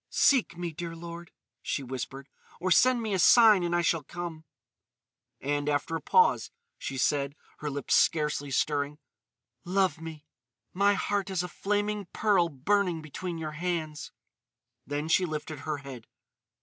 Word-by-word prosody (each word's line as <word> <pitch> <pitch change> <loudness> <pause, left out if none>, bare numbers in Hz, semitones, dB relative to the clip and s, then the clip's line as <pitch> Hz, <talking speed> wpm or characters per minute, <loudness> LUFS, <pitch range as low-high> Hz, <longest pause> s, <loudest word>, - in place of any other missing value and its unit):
"Seek 255 - +3
me, 175 -1 -3
dear 165 +1 -6
lord," 170 0 -8 0.3
she 140 - -2
whispered. 130 +2 -6 0.3
"Or 185 +1 -1
send 250 +3 +5
me 215 -2 -2
a 190 - +1
sign 220 0 +7
and 175 0 0
I 175 - +2
shall 165 -1 +2
come." 165 +1 -7 0.9
And, 145 +1 -1
after 145 +2 0
a 165 - -3
pause, 460 0 +3 0.3
she 135 - -5
said, 140 +1 +1 0.2
her 150 - -3
lips 140 0 -2
scarcely 150 -3 +2
stirring: 145 +1 0 0.7
"Love 185 -2 +1
me. 160 -2 -8 0.5
My 200 +2 +3
heart 200 0 -1
is 185 -2 -1
a - - -3
flaming 205 +2 -2
pearl 195 -6 +3
burning 170 +3 0
between 170 +3 -5
your 155 -1 -4
hands." 155 -3 -3 0.8
Then 145 +2 -2
she 175 +3 +3
lifted 155 -1 -5
her 150 +1 -3
head. 135 -5 -10
165 Hz, 150 wpm, -28 LUFS, 145-185 Hz, 0.9 s, sign